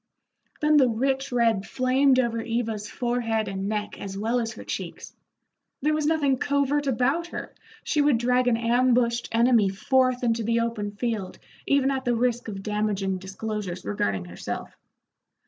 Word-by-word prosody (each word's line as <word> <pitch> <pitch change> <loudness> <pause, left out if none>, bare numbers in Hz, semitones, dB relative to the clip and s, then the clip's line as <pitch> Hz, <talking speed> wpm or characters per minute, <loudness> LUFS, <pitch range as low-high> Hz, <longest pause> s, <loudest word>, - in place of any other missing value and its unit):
Then 300 0 +4
the 260 -4 +5
rich 270 +4 -1
red 230 -5 +2
flamed 260 +3 +2
over 235 -3 +1
Eva's 225 -2 -2
forehead 235 -3 -1
and 195 0 -3
neck 210 -1 -3
as 195 -1 -6
well 225 +4 0
as 230 -1 -3
her - - -10
cheeks. - - -6 0.7
There 305 +1 +3
was 305 -1 0
nothing 285 -5 +2
covert 285 0 +1
about 270 +7 +1
her, - - -7 0.3
she 295 - +1
would 285 -4 +4
drag 250 +1 +2
an 235 -2 +3
ambushed 235 0 +2
enemy 230 -3 +4
forth 255 +5 +1
into 230 -1 +1
the 230 +1 +1
open 230 -3 -2
field 215 -4 -3 0.3
even 275 -1 +3
at 265 -1 -2
the 245 -2 +1
risk 240 0 0
of 195 -3 -6
damaging 205 -3 -1
disclosures 190 -1 -5
regarding 100 -2 -1
herself. 90 0 -6
235 Hz, 160 wpm, -25 LUFS, 210-260 Hz, 0.7 s, the